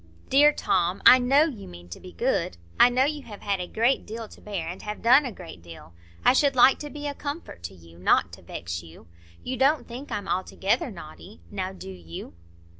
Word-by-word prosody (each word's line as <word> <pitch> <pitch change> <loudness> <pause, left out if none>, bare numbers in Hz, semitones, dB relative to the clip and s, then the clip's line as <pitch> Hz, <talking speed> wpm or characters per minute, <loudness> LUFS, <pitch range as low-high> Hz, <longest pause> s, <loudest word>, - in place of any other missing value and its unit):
"Dear 290 +3 +6
Tom, 185 -8 0
I 255 - +9
know 270 +4 +4
you 285 -10 -5
mean 85 0 -12
to 85 - -8
be 90 - -11
good. 85 0 -1 0.2
I - - +8
know 250 +1 +2
you 295 0 -2
have 210 -6 -11
had 200 -2 -1
a 180 - -5
great 235 +7 +1
deal 225 +1 -6
to - - -16
bear, 195 -6 -5
and 175 +2 -6
have 210 0 -6
done 255 +5 +6
a - - -5
great 170 - -11
deal. 85 -1 -13 0.3
I - - +7
should 275 0 +3
like 255 +2 +6
to 295 - -6
be 295 0 -8
a 290 - -2
comfort 285 - -7
to 95 - -7
you, 85 -1 -17
not 90 - +2
to - - -11
vex 85 0 -6
you. 80 -2 -15 0.4
You 255 - -4
don't 280 +4 +2
think 250 +4 -9
I'm 200 -1 -4
altogether 195 +6 -1
naughty, 185 +2 -12
now, 190 -2 -3
do 185 - -9
you?" 85 -4 -9
205 Hz, 220 wpm, -25 LUFS, -, 0.4 s, I